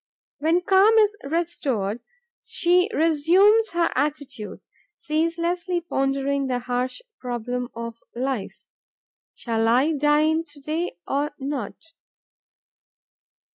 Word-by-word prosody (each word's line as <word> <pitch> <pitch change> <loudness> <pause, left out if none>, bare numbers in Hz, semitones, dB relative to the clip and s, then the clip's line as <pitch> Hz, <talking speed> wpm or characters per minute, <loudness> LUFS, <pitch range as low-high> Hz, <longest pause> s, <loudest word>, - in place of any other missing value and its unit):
When 325 +4 +2
calm 390 +4 +5
is 420 -1 +4
restored, 275 - -1 0.4
she 360 +3 +2
resumes 360 +8 +4
her 340 -1 +1
attitude, 285 -7 -3 0.4
ceaselessly 335 +2 -1
pondering 275 -3 -1
the 250 -1 0
harsh 250 - -3 0.2
problem 245 0 -4
of 230 0 -6 0.2
life: 255 -4 -4 0.7
'Shall 225 -1 -1
I 255 +7 +3
dine 305 +2 +2
to 295 -3 -12
day, 310 - -3
or 285 +2 -1
not?' 280 +3 -6
295 Hz, 95 wpm, -24 LUFS, 250-335 Hz, 0.7 s, calm